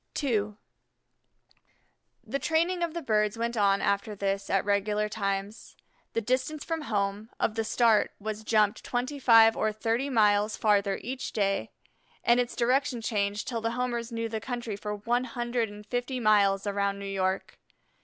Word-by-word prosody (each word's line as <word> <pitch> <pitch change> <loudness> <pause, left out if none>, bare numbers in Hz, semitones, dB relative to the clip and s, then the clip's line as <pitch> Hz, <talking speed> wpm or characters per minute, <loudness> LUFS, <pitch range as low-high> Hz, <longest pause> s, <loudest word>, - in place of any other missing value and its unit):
II 210 -6 0 1.7
The 275 - -2
training 340 +3 +1
of 340 -1 -2
the 340 - -4
birds 210 -2 +1
went 235 +1 -2
on 200 -2 +2
after 200 +1 0
this 195 0 -2
at 195 -1 +1
regular 210 +1 +1
times. 200 0 -4 0.4
The 230 - 0
distance 255 +6 -1
from 325 -1 -2
home, 205 -4 -2
of 220 - +1
the 225 0 -1
start, 225 -1 +3
was 215 +1 -5
"jumped" 215 -2 +2
twenty 255 +4 -3
five 225 -3 +7
or 215 - 0
thirty 230 +5 -1
miles 210 -3 +3
farther 200 -2 +2
each 255 +3 -5
day, 195 -2 0 0.5
and 240 +1 +4
its 245 -1 -1
direction 250 +1 +1
changed 205 -2 -1
till 230 -3 -2
the 230 +1 -1
Homers 240 -1 -2
knew 230 0 -2
the 220 -1 -4
country 240 -3 -4
for 210 +1 -4
one 240 +4 0
hundred 240 -2 -2
and 205 0 -11
fifty 245 +3 -3
miles 200 -3 +3
around 200 -1 0
New 200 - -7
York. 190 -1 -2
220 Hz, 165 wpm, -28 LUFS, 205-245 Hz, 1.7 s, five